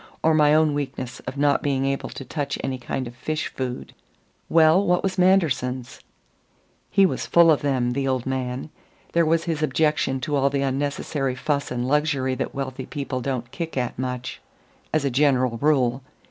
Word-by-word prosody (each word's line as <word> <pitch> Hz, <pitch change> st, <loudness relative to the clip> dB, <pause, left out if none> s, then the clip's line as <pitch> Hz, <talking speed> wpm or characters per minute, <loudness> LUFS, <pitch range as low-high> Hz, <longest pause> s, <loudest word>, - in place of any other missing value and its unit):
or 160 Hz, -, +4 dB
my 150 Hz, -1 st, +5 dB
own 155 Hz, -1 st, +4 dB
weakness 140 Hz, -3 st, -4 dB
of 135 Hz, -, -5 dB
not 145 Hz, 0 st, +3 dB
being 135 Hz, -2 st, 0 dB
able 135 Hz, 0 st, -2 dB
to 135 Hz, -, -8 dB
touch 140 Hz, +1 st, -3 dB
any 130 Hz, -1 st, -2 dB
kind 130 Hz, +2 st, -3 dB
of 120 Hz, -, -9 dB
fish 155 Hz, +4 st, -3 dB
food." 125 Hz, -1 st, -5 dB, 0.6 s
"Well, 160 Hz, +3 st, +5 dB
what 180 Hz, -2 st, +2 dB
was 190 Hz, -1 st, -1 dB
Manderson's?" 135 Hz, -9 st, +1 dB, 0.9 s
"He 195 Hz, -1 st, +5 dB
was -, -, -2 dB
full 170 Hz, -1 st, +6 dB
of 150 Hz, -, +2 dB
them 130 Hz, -4 st, 0 dB
the 135 Hz, +2 st, -1 dB
old 130 Hz, -2 st, 0 dB
man. 130 Hz, +2 st, -3 dB, 0.4 s
There 170 Hz, -1 st, +3 dB
was 165 Hz, +1 st, +2 dB
his 160 Hz, -3 st, -2 dB
objection 150 Hz, -2 st, +1 dB
to 145 Hz, +2 st, -1 dB
all 140 Hz, 0 st, +3 dB
the 140 Hz, 0 st, -1 dB
unnecessary 135 Hz, 0 st, -1 dB
fuss 140 Hz, +2 st, -1 dB
and 125 Hz, 0 st, -2 dB
luxury 140 Hz, -2 st, +1 dB
that -, -, -4 dB
wealthy 130 Hz, -1 st, -4 dB
people 135 Hz, -3 st, -4 dB
don't 125 Hz, -2 st, -3 dB
kick 165 Hz, -4 st, -5 dB
at 125 Hz, -1 st, -2 dB
much, 125 Hz, 0 st, -4 dB, 0.5 s
as 155 Hz, -2 st, +1 dB
a 140 Hz, -, +1 dB
general 130 Hz, -3 st, +2 dB
rule. 135 Hz, -4 st, +2 dB
140 Hz, 180 wpm, -24 LUFS, 130-155 Hz, 0.9 s, full